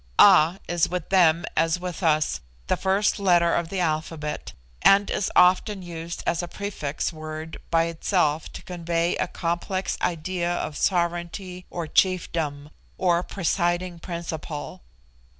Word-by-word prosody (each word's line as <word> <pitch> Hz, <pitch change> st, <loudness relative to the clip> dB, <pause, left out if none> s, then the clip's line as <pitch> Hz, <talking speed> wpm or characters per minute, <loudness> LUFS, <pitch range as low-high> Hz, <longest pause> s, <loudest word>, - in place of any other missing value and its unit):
A 180 Hz, -2 st, +7 dB
is 175 Hz, -1 st, +1 dB
with 180 Hz, -2 st, -4 dB
them, 170 Hz, -3 st, +4 dB
as 165 Hz, +2 st, +2 dB
with 180 Hz, 0 st, -5 dB
us, 155 Hz, -, +2 dB, 0.2 s
the -, -, +1 dB
first 195 Hz, +2 st, +1 dB
letter 175 Hz, -3 st, +4 dB
of 170 Hz, -1 st, 0 dB
the 195 Hz, -, -3 dB
alphabet, 155 Hz, -2 st, -2 dB, 0.3 s
and 200 Hz, +1 st, +5 dB
is 190 Hz, -, -1 dB
often 185 Hz, +2 st, +4 dB
used 170 Hz, -1 st, -6 dB
as 170 Hz, +1 st, +1 dB
a 175 Hz, -, -5 dB
prefix 175 Hz, -8 st, -4 dB
word 155 Hz, 0 st, -7 dB
by 165 Hz, 0 st, +3 dB
itself 165 Hz, -2 st, 0 dB
to -, -, -8 dB
convey 170 Hz, -1 st, -1 dB
a -, -, 0 dB
complex 175 Hz, +3 st, -2 dB
idea 175 Hz, +1 st, -1 dB
of 155 Hz, -, -3 dB
sovereignty 175 Hz, +2 st, -1 dB
or 170 Hz, -2 st, -4 dB
chiefdom, 155 Hz, -4 st, 0 dB, 0.3 s
or 175 Hz, -2 st, +2 dB
presiding 175 Hz, -1 st, -1 dB
principle. 165 Hz, -1 st, -6 dB
170 Hz, 135 wpm, -25 LUFS, 160-180 Hz, 0.3 s, A